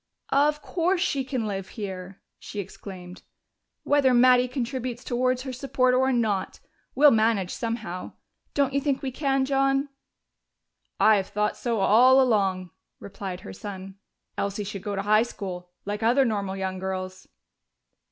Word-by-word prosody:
"Of 295 +2 +2
course 355 +1 0
she 285 -7 0
can 255 -3 -3
live 195 -2 -4
here!" 190 -2 -7 0.2
she 205 - -7
exclaimed, 185 -2 -9 0.6
"whether 275 -3 +3
Mattie 250 0 +5
contributes 250 -1 -4
towards 255 +1 0
her 260 -1 -5
support 255 0 +1
or 260 +1 +3
not. 215 -6 -1 0.4
We'll 290 +2 +7
manage 215 -4 +2
somehow. 225 -6 -4 0.4
Don't 275 -2 +1
you 280 - +1
think 275 -1 -1
we 265 - -2
can, 270 0 0
John?" 275 +1 +1 1.1
"I 215 -1 +6
have 195 - -2
thought 210 +1 -1
so 230 -4 -2
all 250 +7 +6
along," 195 -8 +1 0.3
replied 195 -2 -7
her 205 - -9
son. 195 -1 -8 0.4
"Elsie 200 +1 -2
should 200 -1 -6
go 205 +1 -4
to 195 - -2
high 215 +1 +4
school, 185 -6 -5 0.2
like 205 +2 -3
other 245 +4 +4
normal 200 -4 -2
young 190 -1 -3
girls." 185 0 -5
225 Hz, 150 wpm, -26 LUFS, 195-260 Hz, 1.1 s, We'll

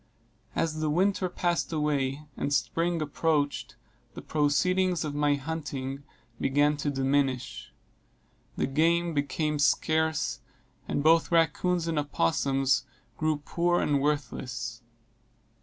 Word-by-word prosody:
As 155 -1 -1
the 155 -1 0
winter 185 +3 +1
passed 175 -1 -1
away 150 -2 0
and 140 - -2
spring 165 +3 0
approached, 150 -1 -1 0.4
the - - -7
proceeds 175 +4 +1
of 150 - -3
my 145 0 +2
hunting 140 -2 -4 0.4
began 145 +2 +2
to 145 0 -1
diminish. 130 -3 -1 0.9
The - - +1
game 165 +4 +2
became 150 +1 -1
scarce, 160 +1 +1 0.5
and 145 - -1
both 165 +1 +4
rackoons 170 +1 +2
and 160 -2 0
opossums 135 - +1 0.3
grew 155 -1 -1
poor 175 +1 +1
and 145 -2 +1
worthless. 125 -4 -2
150 Hz, 110 wpm, -28 LUFS, 140-165 Hz, 0.9 s, both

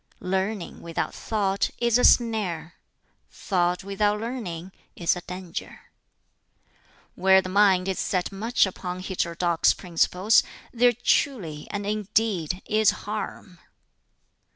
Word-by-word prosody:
"Learning, 190 +1 -2
without 165 -1 -3
thought, 200 -3 -1
is 235 0 +2
a - - +1
snare; 195 -9 +2 0.6
thought, 180 -1 -1
without 205 +1 0
learning, 200 -7 -5 0.2
is 170 0 +1
a 180 - -6
danger. 180 -1 -8 1.2
"Where 190 +1 +5
the 185 - -4
mind 190 -1 +4
is 190 - -2
set 185 0 -1
much 220 +5 +2
upon 185 -1 -5
heterodox 175 -3 +1
principles 180 +4 +2 0.3
there 245 0 +4
truly 170 - 0
and 205 0 -4
indeed 205 -4 -1
is 215 -1 +3 0.2
harm." 205 -3 -6
190 Hz, 110 wpm, -25 LUFS, 180-215 Hz, 1.2 s, Where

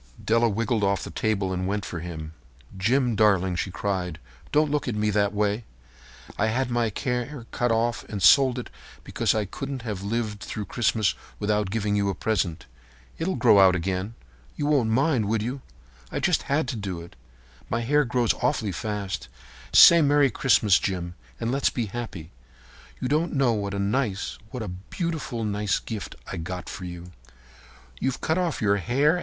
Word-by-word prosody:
Della 115 +1 +3
wriggled 110 +1 0
off 100 0 +1
the - - -7
table 100 -3 0
and 90 0 -2
went 100 +1 -2
for 85 - -5
him. 80 -2 -7 0.4
"Jim, 120 +5 +2
darling," 95 -4 +3
she 90 - -2
cried, 90 -3 -2 0.3
"don't 150 0 +3
look 150 -2 -1
at 120 - -1
me 105 0 +1
that 100 0 +2
way. 105 +2 0 0.8
I 110 - +3
had 125 +3 0
my 120 -2 +1
hair 125 +1 -2
cut 120 -1 0
off 115 +1 0
and 105 - -5
sold 125 +6 +5 0.3
because - - 0
I 110 -1 0
couldn't 135 +5 -6
have 105 -5 -4
lived 105 0 -2
through 105 0 -5
Christmas 110 -3 +1 0.2
without 105 -1 0
giving 105 0 0
you 100 -1 +1
a 95 - -2
present. 90 -5 -1 0.5
It'll 185 +3 -1
grow 110 -5 +5
out 95 -1 +6
again—you 90 - -5
won't 140 -6 +2
mind, 130 0 +2
will 110 0 0
you? 130 +4 -4 0.5
I - - -2
just - - +1
had 140 0 +1
to 135 - -2
do 95 -5 -4
it. 85 - -13 0.5
My 115 - 0
hair 145 +5 +3
grows 120 -2 +1
awfully 115 -4 0
fast. 100 +1 -4 0.4
Say 170 0 +9
'Merry 145 -2 +4
Christmas!' 110 -6 +4
Jim, 90 -3 -3 0.3
and 115 0 -1
let's 135 +1 +2
be 120 - -2
happy. 100 -7 -6 0.7
You 125 - -2
don't 155 +5 +1
know 135 -5 +3
what 100 -2 -2
a - - -2
nice—what 105 +1 -2
a - - -5
beautiful, 120 - -4
nice 105 -2 0
gift 110 -4 -6
I've 80 - -5
got 90 0 -6
for 90 - -7
you." 90 0 -8 0.9
"You've 135 -1 -1
cut 160 +3 0
off 170 -9 -1
your 100 0 +3
hair?" 140 - +2
110 Hz, 175 wpm, -25 LUFS, 100-125 Hz, 0.9 s, Say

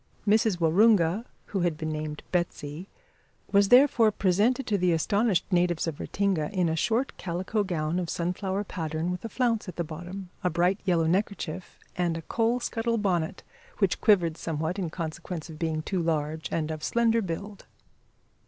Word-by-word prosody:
Mrs 215 -2 +3
Waroonga 185 +3 +4 0.2
who 200 - -3
had 175 -3 0
been 155 -1 -3
named 155 -1 -4
Betsy 175 -1 -3 0.6
was 200 -1 +4
therefore 245 -4 +6
presented 210 +8 +2
to 210 - 0
the 180 -1 +3
astonished 200 +3 +2
natives 175 -2 +2
of 160 -3 -4
Ratinga 190 -7 -1
in 180 -4 +1
a 160 - 0
short 230 - 0
calico 185 +4 -2
gown 170 -2 -1
of 175 -2 -3
sunflower 190 +3 -2
pattern 160 -2 -3
with 180 - -5
a 230 - -4
flounce 230 -4 0
at - - -8
the 170 - -1
bottom, 175 +4 -8
a 180 - +2
bright 175 +4 +1
yellow 170 -4 +2
neckerchief, 185 -1 -2 0.2
and 175 -2 0
a 165 - -7
coal 230 +5 +1
scuttle 230 -1 -1
bonnet, 185 -5 -1 0.3
which 195 -4 +1
quivered 175 -7 +4
somewhat 160 +3 -3
in 180 -4 -2
consequence 165 0 -5
of 155 - -11
being 160 -2 -1
too 185 +1 -1
large 155 -1 -2
and 160 -1 -1
of 155 -1 -6
slender 230 -1 +2
build. 200 +2 -6
180 Hz, 170 wpm, -27 LUFS, 165-205 Hz, 0.6 s, therefore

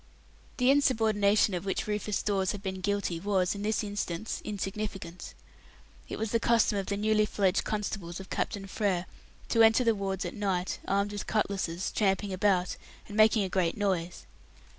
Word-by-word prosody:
The 250 +1 +4
insubordination 220 -7 +3
of 175 -1 -2
which 195 -1 -2
Rufus 210 0 -2
Dawes 195 -2 +1
had 205 -1 -7
been 190 -1 -4
guilty 200 -3 -1
was, 190 -1 +1
in 200 - -6
this 215 +1 0
instance, 205 -1 -3
insignificant. 195 -3 -5 0.7
It - - -4
was 220 -1 -2
the 230 - +2
custom 230 -3 +3
of 195 - -4
the 200 - -1
newly 215 0 +2
fledged 195 -2 +1
constables 200 -5 -3
of 190 - -10
Captain 200 -3 -2
Frere 195 -3 -1 0.4
to 230 - +3
enter 225 +2 +6
the 230 -1 +4
wards 195 -1 -3
at 175 - -4
night, 190 -3 -1
armed 200 +1 +1
with 205 -1 -5
cutlasses, 190 -4 -1
tramping 195 -1 +1
about, 185 -1 +1 0.3
and 205 - -8
making 215 0 +5
a - - -1
great 180 -3 0
noise. 180 -4 -1
200 Hz, 170 wpm, -29 LUFS, 190-215 Hz, 0.7 s, enter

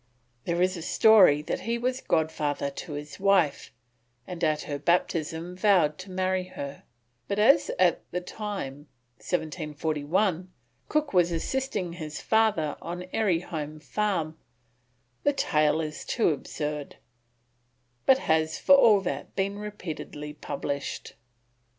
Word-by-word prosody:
There 170 +1 +1
is 185 +1 +1
a 170 - -6
story 185 -6 +6
that - - -2
he 235 +1 -2
was 255 +2 -1
godfather 150 -3 0
to 150 +3 -7
his 145 0 -7
wife, 190 -6 +2 0.5
and 175 -1 -7
at 155 -1 +1
her 145 -1 -4
baptism 165 +1 0
vowed 180 -6 +3
to 185 +1 -9
marry 185 0 0
her, 140 -6 -8 0.4
but 200 - -2
as 275 +8 +5
at 180 -2 +3
that 180 0 -4
time, 160 -11 -5 0.3
1741, 160 - -1 0.4
Cook 305 -4 0
was 175 -2 +4
assisting 195 0 -2
his 155 -3 -6
father 215 -10 +1
on 175 +1 -5
Airy 190 -7 +2
Holme 155 -3 -6
Farm, 165 -3 -2 0.8
the 285 - +2
tale 155 - +2
is 155 -1 -5
too 230 - +1
absurd, 150 -1 -4 1.1
but 265 - +7
has 160 -6 +1
for - - +5
all 220 -7 +7
that 190 - -5
been 200 +1 -1
repeatedly 160 -7 -6
published. 140 -1 -5
170 Hz, 130 wpm, -27 LUFS, 150-200 Hz, 1.1 s, but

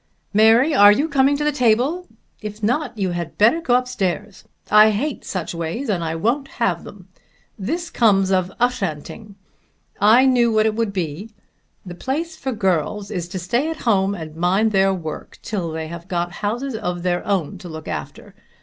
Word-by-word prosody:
"Mary, 225 +8 +5
are 205 -6 +8
you 280 +9 +2
coming 280 -1 +2
to 295 - -2
the 300 - +2
table? 270 +7 +1 0.3
If 210 0 -7
not 245 +2 -1
you 190 -3 -1
had 175 -1 -5
better 235 +11 +4
go 250 -7 +2
up 250 0 +1
stairs. 190 -3 -3 0.3
I 215 +1 +8
hate 250 +7 -2
such 185 -3 -4
ways, 170 +11 -4
and 180 -5 0
I 160 0 -2
won't 240 - 0
have 180 -8 0
them. 190 -2 -12 0.5
This 330 - -3
comes 195 -5 +3
of 185 -1 +1
Ushanting! 210 -3 -2 0.6
I 225 +6 +6
knew 245 -3 +3
what 215 0 +3
it 220 - +2
would 225 -1 -1
be. 180 +2 -4 0.6
The 180 - -7
place 310 - -3
for 265 - -4
girls 200 0 -1
is 180 -4 -3
to 185 +2 -6
stay 235 - -1
at 325 - -4
home 200 -3 +2
and 160 -4 -8
mind 190 +6 +2
their 195 -1 +3
work, 165 -5 -6
till 190 -7 -3
they 160 0 -4
have 170 +1 -9
got 175 -1 -2
houses 240 +6 -2
of 180 -5 -4
their 175 -1 0
own 195 -2 -2
to 180 -2 -9
look 160 -1 -8
after. - - -7
205 Hz, 185 wpm, -21 LUFS, 180-245 Hz, 0.6 s, are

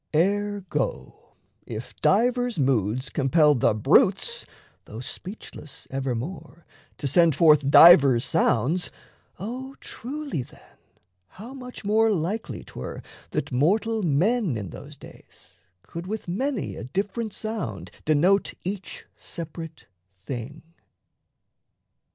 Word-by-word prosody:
Ergo, 205 - -1 0.3
if - - -7
divers 245 +1 +2
moods 130 -2 0
Compel 150 +2 +4
the 120 -5 +2
brutes, 110 - +3 0.4
though 110 - -9
speechless 150 - -9
evermore, 135 +6 -5 0.3
To - - -6
send 165 +2 +4
forth 150 -2 +5
divers 140 -7 +8
sounds, 145 +11 +1 0.5
O 255 +6 -6
truly 280 - -5
then - - -15 0.5
How 225 - -11
much 250 -5 -9
more 220 +2 +3
likely 200 +3 -2
'twere 65 - -8 0.3
that - - -3
mortal 210 - +1
men 180 - +1
In 100 -6 -6
those - - -11
days - - -16 0.2
could 170 +2 -8
with 215 0 -5
many 250 +7 -2
a - - -7
different 205 - -3
sound 135 - -5
Denote 175 +6 +2
each 195 +1 -5
separate 165 -1 -9 0.3
thing. 120 - -7
170 Hz, 105 wpm, -25 LUFS, 135-215 Hz, 0.5 s, divers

